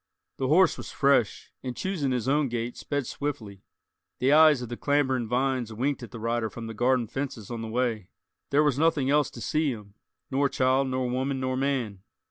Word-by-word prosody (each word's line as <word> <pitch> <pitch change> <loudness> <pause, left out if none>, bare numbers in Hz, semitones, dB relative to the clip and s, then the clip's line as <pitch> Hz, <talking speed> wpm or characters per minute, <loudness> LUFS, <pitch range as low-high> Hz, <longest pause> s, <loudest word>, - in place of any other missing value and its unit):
The 130 - -1
horse 175 +5 +4
was - - -7
fresh, 140 -6 +1
and 125 -2 -5
choosing 180 -8 -1
his 125 -1 -1
own 145 +1 +2
gait, 120 0 -3
sped 145 -2 -3
swiftly. 110 -9 -5 0.6
The 135 +3 +3
eyes 155 -4 +6
of 120 - -7
the 120 - -4
clambering 130 -3 +1
vines 125 -1 0
winked 130 +6 -1
at 120 - -8
the 115 - -9
rider 115 0 -1
from 115 +2 -8
the 115 - -6
garden 125 +2 +2
fences 120 -3 -5
on 115 -1 -4
the 115 - -5
way; 115 -4 -1 0.4
there 145 +2 +4
was 145 -3 +1
nothing 150 -4 +2
else 150 -1 +3
to 120 - -11
see 150 +8 0
him, 105 -4 -9 0.4
nor 140 +1 +2
child 130 +1 +2
nor 130 -1 -1
woman 130 +2 -1
nor 130 0 -1
man. 130 -8 -1
130 Hz, 200 wpm, -27 LUFS, 120-140 Hz, 0.6 s, eyes